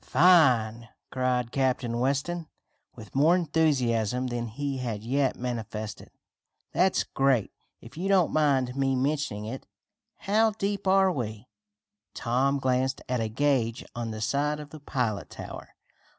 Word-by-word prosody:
"Fine!" 125 -9 +4 0.2
cried 125 -2 0
Captain 125 -3 0
Weston, 140 +6 -1 0.5
with 110 -2 -12
more 155 +6 +4
enthusiasm 130 - +1
than 120 -1 -3
he 135 +4 -4
had 115 -4 -4
yet 135 +3 +1
manifested. 110 -3 -5 0.6
"That's 185 +2 +2
great, 135 -6 +1 0.3
if 120 +5 -13
you 185 +3 -2
don't 190 -4 +3
mind 135 -5 +2
me 135 -1 +1
mentioning 135 -6 -1
it. 125 +5 -7 0.5
How 220 +2 +2
deep 200 -1 -2
are 190 0 +5
we?" 115 - -5 0.7
Tom 130 +4 +1
glanced 130 0 0
at 125 -1 -1
a 110 - -1
gage 120 -2 0
on 120 -1 -4
the 110 -1 -6
side 145 +7 0
of 150 -2 -9
the 155 - -9
pilot 120 -7 -2
tower. - - -9
130 Hz, 135 wpm, -27 LUFS, 115-150 Hz, 0.7 s, are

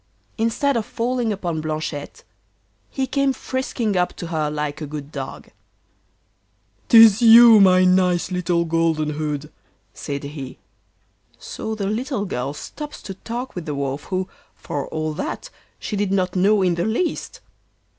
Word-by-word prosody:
Instead 235 +5 0
of 225 - -1
falling 240 -1 -1
upon 175 -6 -3
Blanchette 155 -2 -5 0.7
he 270 - -2
came 275 0 +1
frisking 255 -6 -3
up 180 -1 +1
to - - -7
her 160 -3 -1
like 150 0 -4
a 150 - -4
good 145 0 -7
dog. 135 -3 -7 1.4
''Tis 225 -2 +8
you! 230 -1 +9
my 185 -2 +6
nice 180 -1 +2
Little 175 -1 0
Golden 165 -2 0
hood,' 150 0 -4 0.4
said 140 0 -5
he. 140 -2 -7 0.8
So 220 - -6
the 205 -2 -3
little 225 +2 -2
girl 135 -5 -3
stops 295 - -8
to 195 - -6
talk 240 +6 -6
with 175 -2 -7
the 150 - -3
Wolf, 140 +1 -3
who, 185 0 -2 0.3
for 140 -2 -5
all 155 -1 -3
that, 345 - -5 0.3
she 210 - -5
did 200 -1 -1
not 185 -2 0
know 195 +2 +3
in 180 -1 +2
the 170 +1 -1
least. 235 +11 -2
180 Hz, 150 wpm, -21 LUFS, 155-225 Hz, 1.4 s, you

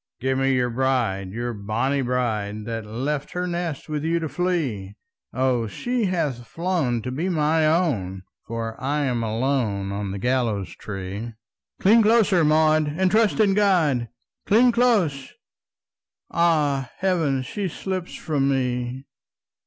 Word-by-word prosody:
"Give 130 +1 0
me 135 0 +2
your 125 -1 +1
bride, 120 -7 0
your 120 +4 -3
bonnie 115 +7 -1
bride, 110 -5 -2
That 115 -1 -4
left 135 +6 -3
her 180 0 -2
nest 175 -4 -3
with 150 -1 -3
you 165 +1 +1
to 160 - -2
flee! 140 - -2 0.4
O, 125 -2 +1
she 245 - -2
hath 150 -10 -2
flown 155 -6 -1
to 125 - -4
be 160 +8 -2
my 155 -1 +2
own, 115 - 0 0.2
For 115 0 -5
I'm 135 -3 0
alone 110 -4 -1
on 100 0 -3
the 100 - -4
gallows 115 -4 0
tree!" 100 +3 -6 0.5
"Cling 220 +4 +6
closer, 210 -5 +4
Maud, 155 0 +4
and 185 -1 +2
trust 220 0 +3
in 205 -3 +4
God! 165 - +2 0.4
Cling 240 +4 +5
close! 205 - +1 1.0
Ah, 150 -6 +2
heaven, 165 -8 +1
she 195 +10 -3
slips 185 +1 -4
from 140 -4 0
me!" 125 0 -1
135 Hz, 135 wpm, -23 LUFS, 115-170 Hz, 1.0 s, Cling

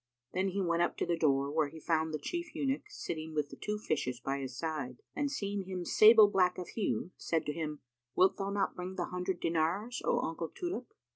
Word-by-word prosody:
Then 190 +1 +1
he 195 +1 -1
went 170 -1 +1
up 175 - +1
to - - 0
the 170 - +1
door, 140 -3 +2
where 155 -1 +2
he 160 +3 -10
found 160 0 +1
the 155 - -1
Chief 345 - -4
Eunuch 275 +9 -1
sitting 160 - -5
with 150 -1 0
the - - -9
two 210 0 -3
fishes 130 - -1
by 135 +2 -2
his 130 -2 -5
side: 140 -6 -4
and 285 0 0
seeing 200 -7 -2
him 185 -2 -4
sable 215 +2 +8
black 185 -3 +3
of 180 - -5
hue, 200 -4 -1
said 165 -2 -1
to 150 - -1
him, 150 -2 -4 0.3
"Wilt 185 +1 +4
thou 195 -1 -2
not 200 0 0
bring 180 +1 -5
the 175 - -1
hundred 180 0 -2
dinars, 170 +9 0
O - - +2
uncle 165 0 -3
Tulip?" 350 -9 -5
175 Hz, 220 wpm, -32 LUFS, 155-200 Hz, 0.3 s, sable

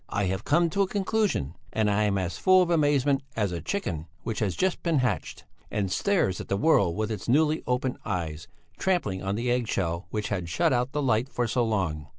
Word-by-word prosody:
I 100 - -1
have 95 +1 -2
come 170 +3 +2
to 200 - +1
a 195 - +3
conclusion, 195 - 0 0.2
and 110 -1 +1
I 105 +1 +2
am 100 -1 +1
as 90 -2 -3
full 185 -1 +6
of 175 - -2
amazement 145 -3 +3
as 105 -4 0
a 85 -2 -4
chicken 85 - -3 0.2
which 110 -2 -3
has 100 -5 0
just 190 -1 0
been 165 -3 +1
hatched, 125 -2 -2 0.2
and 100 -3 -2
stares 175 - +1
at - - -9
the 100 - 0
world 100 - +3
with 110 +1 -2
its 110 - -5
newly 155 +4 +3
opened 125 0 -1
eyes, 85 -4 -4 0.3
trampling 170 - 0
on 95 +1 -2
the 120 +3 -1
egg 120 -2 0
shell 85 -2 -2
which 105 -1 -3
had 90 -5 -3
shut 85 - +2
out 125 +1 0
the 150 0 -1
light 125 0 +1
for 120 -2 -1
so 120 +2 +1
long. 90 -10 -1
110 Hz, 220 wpm, -27 LUFS, 95-150 Hz, 0.3 s, full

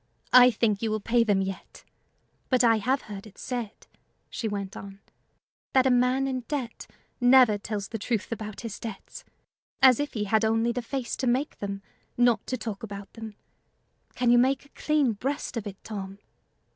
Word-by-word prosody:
"I 250 0 +9
think 215 -3 0
you 225 - 0
will 215 0 -1
pay 235 +3 +2
them 200 -3 +2
yet. 190 -1 -7 0.7
But 255 -1 +3
I 225 -2 +5
have 260 +6 0
heard 205 0 -9
it 200 - -17
said," 240 -4 -5 0.5
she 230 - -3
went 200 -2 -4
on, 195 0 -9 0.7
"that 260 -1 +4
a 260 - +4
man 250 +2 +2
in 260 -1 -1
debt 260 -6 -4 0.3
never 245 -4 +6
tells 205 -1 -4
the 225 - -5
truth 220 +1 -2
about 215 -2 -5
his 225 -3 -6
debts 220 -4 -8 0.6
as 255 -3 +6
if 290 0 -2
he 215 - -2
had 215 +2 +1
only 225 +2 +2
the 245 +1 -3
face 245 +1 -4
to 255 - -1
make 260 +5 0
them, 200 -1 -5 0.3
not 240 -3 +3
to 255 - -2
talk 215 -3 -6
about 200 -2 -8
them: 220 -2 -9 0.8
can 245 -1 +2
you 240 - +6
make 265 +3 +2
a - - -21
clean 295 -6 +1
breast 265 +6 -3
of 225 -3 -4
it, 195 -1 -8
Tom?" 195 -2 -6
230 Hz, 185 wpm, -27 LUFS, 205-250 Hz, 0.8 s, I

